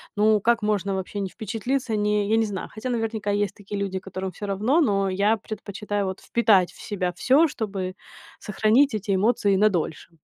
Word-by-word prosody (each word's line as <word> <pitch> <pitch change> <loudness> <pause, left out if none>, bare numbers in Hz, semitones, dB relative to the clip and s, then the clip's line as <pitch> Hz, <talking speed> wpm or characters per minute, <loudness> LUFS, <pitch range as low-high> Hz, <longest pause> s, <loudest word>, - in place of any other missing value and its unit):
ну, 210 0 +4
как 235 +2 +2
можно 200 -2 0
вообще 190 +2 -4
не 195 -2 -2
впечатлиться, 230 +4 -2
не 210 0 +1
я 225 - +3
не 225 - +3
знаю. 195 -3 -5
Хотя, 220 +4 -5
наверняка, 220 -3 -2
есть 205 0 0
такие 205 0 -6
люди, 190 -1 -2
которым 190 0 -5
всё 205 +4 -7
равно, 215 - +2
но 195 -8 +2
я 200 +4 +2
предпочитаю 205 -1 -4
вот 190 0 -4
впитать 210 -6 +3
в - - -19
себя 185 -3 -2
всё, 280 - +4
чтобы 195 -7 -4 0.4
сохранить 220 +6 +2
эти 205 -2 -1
эмоции 205 0 +2
на 210 +2 +4
дольше. 170 -3 -3
205 Hz, 185 wpm, -24 LUFS, 195-220 Hz, 0.4 s, ну